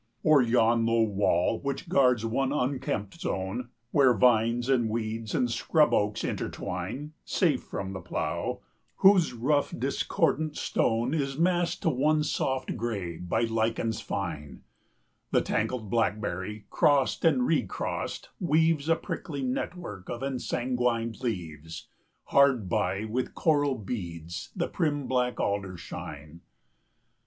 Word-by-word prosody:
O'er 155 -3 +6
yon 115 -1 +3
low 115 0 +3
wall, 100 -1 +1
which 140 +4 -4
guards 125 - +3
one 130 +4 0
unkempt 125 -7 -2
zone, 95 +6 -3 0.2
Where 130 -4 +5
vines 115 +2 +3
and 125 -4 +2
weeds 110 0 -3
and 125 - +2
scrub 150 +5 +3
oaks 105 0 +1
intertwine 110 - -4
Safe - - +1
from 95 0 -5
the 95 - -6
plough, 85 - -3 0.3
whose 190 -7 +5
rough, 140 +5 +1
discordant 155 0 0
stone 115 +4 0
80 155 -3 +1
Is 135 0 -5
massed 175 +1 +1
to 165 - +3
one 150 +3 +2
soft 130 -3 -1
gray 100 -8 -3
by 90 +7 -1
lichens 115 0 0
fine, 75 -9 -5 0.7
The - - +3
tangled 115 -6 -2
blackberry, 105 -2 -1
crossed 140 -3 +3
and 250 +10 +4
recrossed, - - -2
weaves 160 -3 +2
A 165 - +5
prickly 145 -4 -5
network 125 - -4
of 120 +2 -4
ensanguined 125 -3 -1
leaves; 80 - -5 0.3
Hard 135 -7 +3
by, 95 +4 0
with 120 +4 -3
coral 145 -4 +2
beads, 85 -7 -6
the - - -1
prim 145 -4 -1
black 125 -1 0
alders 95 -3 -2
shine. 75 +3 -8
120 Hz, 130 wpm, -28 LUFS, 105-140 Hz, 0.7 s, O'er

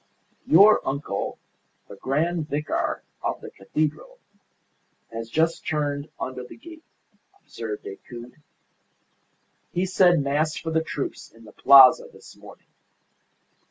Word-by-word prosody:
"Your 200 +6 +7
uncle, 135 -7 -3 0.5
the - - -11
grand 155 - -1
vicar 150 +2 -2 0.2
of - - -3
the - - -10
cathedral, 155 - -3 0.9
has 115 0 -6
just 165 +6 0
turned 145 -1 -2
under 130 -1 -5
the 125 - -12
gate," 325 +6 -13 0.6
observed 110 -2 -7
Decoud. 120 +7 -11 1.3
"He 180 +2 -1
said 180 -2 +4
Mass 150 +3 0
for 165 - -5
the 160 0 +1
troops 145 -3 -5
in 115 0 -18
the 105 - -13
Plaza 135 +1 +7
this - - -16
morning. - - -15
150 Hz, 120 wpm, -24 LUFS, 125-165 Hz, 1.3 s, Your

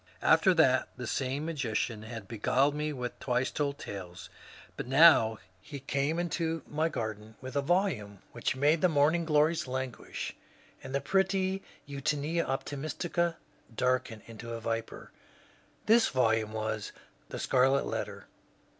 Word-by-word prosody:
After 190 -3 +5
that 130 -6 +4
the 125 - -5
same 135 +5 -2
magician 120 -7 -2
had 110 -2 -8
beguiled 125 +6 +2
me 150 +1 -2
with 125 -4 -4
*^ - - -34
Twice 125 0 0
Told 140 -1 -1
Tales," 95 -8 -8 0.4
but - - -5
now 135 -6 +6 0.2
he 145 +4 -8
came 140 +4 -1
into 165 -2 -1
my 155 +2 0
garden 110 -5 -5
with 130 0 -8
a 140 - +2
volume 140 - 0
which 120 +2 -2
made 150 +4 +3
the 185 - +5
morning 155 +3 +3
glories 155 0 +2
languish 130 -2 -4 0.5
and 135 0 -6
the 140 - +1
pretty 190 0 +1 0.3
Eutoenia 145 +4 -1
optimistica 155 +5 -2 0.4
darken 125 -3 0
into 115 +1 -8
a - - -5
viper. 115 0 -4 0.7
This 225 +1 +5
volume 110 -4 +1
was 110 -1 -3
^' - - -21 0.3
The - - -5
Scarlet 135 +1 +3
Letter." - - -4
135 Hz, 145 wpm, -30 LUFS, 115-160 Hz, 0.7 s, now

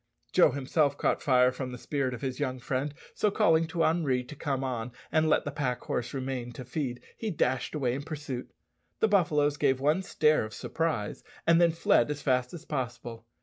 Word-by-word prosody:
Joe 180 - +6
himself 140 +1 +1
caught - - +1
fire 125 -2 +4
from 130 0 -5
the 125 - -6
spirit 130 0 -2
of 115 - -10
his 130 -2 -3
young 130 -3 -1
friend, 135 +3 -2 0.2
so 210 - +2
calling 165 -4 +3
to 165 0 0
Henri 150 -6 +2
to 140 +5 -10
come 135 -2 -2
on 125 -2 -3 0.2
and 155 -1 +3
let - - +3
the 145 - -2
pack 130 -4 -2
horse 120 0 -2
remain 130 -2 -4
to 130 - -8
feed, 125 -2 -3
he 220 - -3
dashed 130 - 0
away 130 -5 0
in 135 - -3
pursuit. 145 -4 -6 0.5
The 220 - +4
buffaloes 155 -8 +2
gave 130 -2 +2
one 150 +7 +2
stare 155 - +2
of 110 -1 -7
surprise, 155 -11 -2 0.2
and 170 +1 +5
then 170 - +6
fled 160 -5 +3
as 145 0 -4
fast 125 -2 +1
as 170 - -9
possible. 120 -4 -5
140 Hz, 200 wpm, -29 LUFS, 125-155 Hz, 0.5 s, Joe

